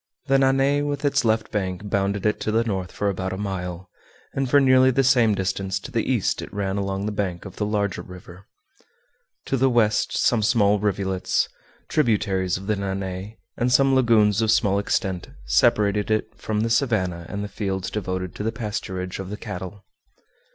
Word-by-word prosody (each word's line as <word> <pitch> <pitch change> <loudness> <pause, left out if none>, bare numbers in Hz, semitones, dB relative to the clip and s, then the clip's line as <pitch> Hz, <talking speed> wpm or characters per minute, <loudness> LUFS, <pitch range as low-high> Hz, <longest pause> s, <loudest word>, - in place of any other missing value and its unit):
The 135 0 +3
Nanay 135 +2 +3
with 145 0 -2
its 145 - +2
left 110 -1 +1
bank 95 -1 -3
bounded 100 0 -1
it 105 - +1
to 110 - -2
the 115 +2 +2
north 95 -6 -3
for 105 - -2
about 95 -1 -2
a - - -4
mile, 95 -2 -4 0.5
and 135 -2 -1
for 145 - +6
nearly 130 -1 +5
the 135 +1 +2
same 120 -5 +4
distance 95 0 -2
to - - -10
the - - 0
east - - 0
it - - -8
ran 100 -1 -2
along 100 0 -2
the 105 - -1
bank 95 -4 -3
of 95 - -10
the 105 - -1
larger 100 -4 -1
river. 90 +1 -12 1.0
To 135 - 0
the 135 +1 +3
west 115 -4 +2
some 120 -3 +2
small 105 -2 +3
rivulets, 95 -2 0 0.4
tributaries 100 - +1
of 95 - -9
the 105 +1 +1
Nanay, 95 +1 -4 0.2
and 125 +1 +1
some 135 +1 +4
lagoons 115 -5 +4
of 110 - +1
small 100 -2 +3
extent, 95 -3 -2 0.2
separated 100 - +2
it 110 0 0
from 105 -1 -2
the 115 +1 0
savannah 95 -9 0
and 100 0 -4
the - - -3
fields 95 -2 -3
devoted 95 -3 -3
to - - -7
the 110 - 0
pasturage 95 -5 -4
of 95 -1 -6
the 105 - -5
cattle. 95 +1 -7
100 Hz, 185 wpm, -23 LUFS, 95-115 Hz, 1.0 s, for